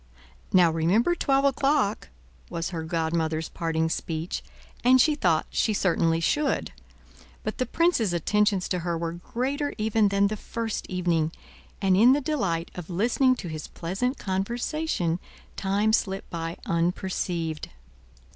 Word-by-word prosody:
"Now 180 -3 +5
remember 180 - +2
twelve 275 -4 +2
o'clock," 270 - +1 0.4
was 165 +2 -3
her 165 -2 -3
godmother's 160 -1 -1
parting 160 -1 -1
speech; 160 +1 -3 0.4
and 255 +1 +6
she 305 +4 +5
thought 175 - +2
she 220 - +1
certainly 165 -3 +2
should. 290 - 0 0.7
But - - -4
the 255 - 0
prince's 335 - +2
attentions 200 +3 +1
to 180 - 0
her 170 -1 -2
were 165 0 -2
greater 260 - -3
even 215 -1 +2
than 200 0 +2
the 215 +1 -1
first 225 +1 -4
evening, 170 -4 0 0.5
and 190 -1 +4
in 235 +7 +7
the 285 - +2
delight 195 - -1
of 180 -1 -8
listening 240 +8 +2
to 185 - -7
his 155 -2 -6
pleasant 200 +11 -2
conversation, 195 - -1 0.4
time 205 +2 +1
slipped 195 -3 0
by 165 0 -4
unperceived. 170 -2 -1
190 Hz, 135 wpm, -26 LUFS, 165-240 Hz, 0.7 s, in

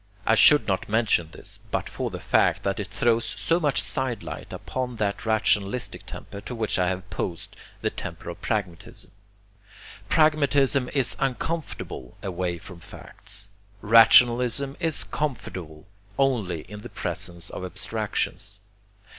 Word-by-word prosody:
I 110 - +4
should 145 +6 +7
not 95 -1 -1
mention 105 -7 +2
this, - - -9
but - - -1
for - - -3
the - - -6
fact - - +2
that 100 +1 -1
it 100 - -3
throws 115 +1 +2
so 165 +1 +2
much 150 -5 +2
sidelight 130 -5 -2
upon 125 -1 -4
that 105 0 -2
rationalistic 110 +1 0
temper 100 - -8
to 125 - -6
which 110 -4 -1
I 90 -1 +3
have 95 - 0
opposed 95 -2 -5 0.3
the - - 0
temper - - -6
of - - -12
pragmatism. 95 -6 -4 1.0
Pragmatism 140 -4 +3
is 135 -4 +3
uncomfortable 135 - -3
away 90 -2 -2
from 85 +1 -11
facts. 100 +3 -5 0.3
Rationalism 120 +4 +6
is 165 -4 0
comfortable 95 - -4 0.3
only 110 - +1
in 105 +6 -10
the - - -8
presence 85 -2 -4
of - - -6
abstractions. 100 +2 -3
110 Hz, 135 wpm, -25 LUFS, 95-130 Hz, 1.0 s, should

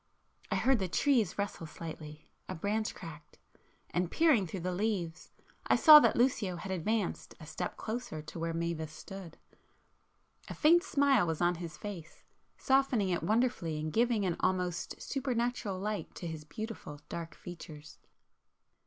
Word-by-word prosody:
I - - 0
heard 265 -2 +3
the 190 - -1
trees 225 - +2
rustle 200 -5 -3
slightly,—a 155 -1 -9
branch 210 +5 -1
cracked,—and 165 +2 -7
peering 285 - +3
through 180 +2 -5
the 180 +1 -2
leaves, 180 -4 -2 0.4
I - - +5
saw 305 -2 +10
that - - +3
Lucio 235 -7 +2
had 190 +2 -6
advanced 195 +3 -2
a 155 - -10
step 155 - -5
closer 220 -8 -4
to 165 - -8
where 165 0 -1
Mavis 165 -2 -3
stood. 180 +1 -10 1.1
A - - -6
faint 335 +3 +5
smile 280 - +3
was 160 -2 -1
on 175 0 +3
his 165 -3 -7
face, 180 -6 -8 0.3
softening 265 -7 +2
it 175 - 0
wonderfully 215 -9 0
and 155 0 -4
giving 230 -3 +2
an 175 -3 0
almost 180 -2 -1
supernatural 245 -6 -2
light 205 -3 -4
to - - -7
his 160 -2 -6
beautiful 215 -5 -7
dark 165 -1 -6
features. 155 -4 -10
185 Hz, 145 wpm, -32 LUFS, 165-225 Hz, 1.1 s, saw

